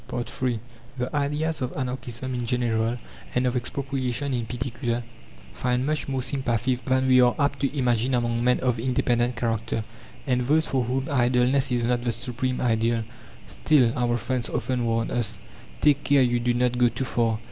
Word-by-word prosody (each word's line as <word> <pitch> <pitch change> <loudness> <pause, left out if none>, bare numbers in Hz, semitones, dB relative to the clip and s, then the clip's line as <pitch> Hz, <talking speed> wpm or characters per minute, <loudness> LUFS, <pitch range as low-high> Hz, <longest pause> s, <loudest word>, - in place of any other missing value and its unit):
III 125 -1 -2 0.4
The 125 +4 -3
ideas 150 +2 -1
of 130 0 -2
Anarchism 130 -1 -4
in 120 -1 -3
general 115 -1 0 0.4
and 125 +1 +2
of 125 0 +1
Expropriation 135 +1 -2
in 120 -2 -2
particular 120 -1 -3 0.5
find 125 - 0
much 155 +1 -1
more 135 -2 -1
sympathy 130 -2 0
than 130 +1 0
we 130 -1 +6
are 125 -1 +4
apt 140 -1 0
to 140 +1 -1
imagine 125 0 +2
among 120 -1 0
men 125 0 +3
of 125 -3 +1
independent 120 0 +1
character, 115 -1 -1 0.4
and 125 -3 +1
those 155 +2 +3
for 130 -2 0
whom 130 +3 -1
idleness 125 +1 +2
is 120 -1 +1
not 120 0 +1
the 120 - +1
supreme 125 +2 -2
ideal. 115 -1 +1 0.4
"Still," 130 -7 +3
our 120 -1 +1
friends 125 +1 -2
often 125 -2 -1
warn 115 0 0
us, 120 -3 -1 0.4
"take 145 -1 +4
care 140 -2 +4
you 120 -1 +2
do 120 +1 +1
not 125 0 +1
go 120 -1 +5
too 130 - -3
far! 115 -3 +1
125 Hz, 175 wpm, -25 LUFS, 120-130 Hz, 0.5 s, we